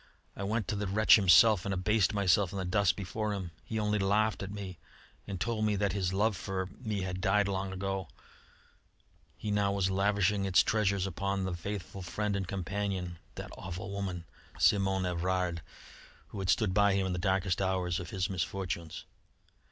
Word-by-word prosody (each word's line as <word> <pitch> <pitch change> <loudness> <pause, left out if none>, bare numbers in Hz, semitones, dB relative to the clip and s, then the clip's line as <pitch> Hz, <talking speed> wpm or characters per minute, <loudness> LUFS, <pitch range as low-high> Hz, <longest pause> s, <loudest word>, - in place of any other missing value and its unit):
I - - -7
went 105 0 -1
to - - 0
the 100 0 -2
wretch 105 +3 +6
himself 100 0 +6
and 100 - -3
abased 95 +2 +2
myself 100 -2 +2
in 100 - -5
the 95 - -2
dust 100 +3 +2
before 105 +2 -3
him. 95 -4 -5
He 110 - -4
only 105 -1 +1
laughed 105 +3 +1
at 95 - -4
me 95 -4 -7 0.5
and 100 -3 -4
told 115 0 -1
me 105 -1 +2
that 100 -2 0
his 95 -3 0
love 105 +3 +1
for 95 +1 -3
me 110 -5 -3
had 95 0 -4
died 100 +2 +3
long 95 -1 -2
ago; 95 -1 -3 1.3
he 105 - -3
now 100 -1 +2
was 95 -1 0
lavishing 100 +1 +2
its 95 -2 +5
treasures 100 -3 +1
upon 95 +1 -2
the 95 -1 -2
faithful 95 +1 -5
friend 105 +3 -2
and 95 -2 -2
companion 95 -2 -3 0.2
that - - -7
awful 95 +1 -6
woman, 95 -3 -4 0.3
Simonne 95 -2 +3
Evrard 90 -1 -1 0.7
who 100 - -7
had 95 -1 -2
stood 95 -1 +2
by 100 0 +4
him 95 -1 +1
in 95 - -1
the 90 - -2
darkest 95 0 +1
hours 90 -2 0
of 85 -2 -7
his 95 -2 -1
misfortunes. 90 -2 -4
95 Hz, 185 wpm, -31 LUFS, 90-100 Hz, 1.3 s, wretch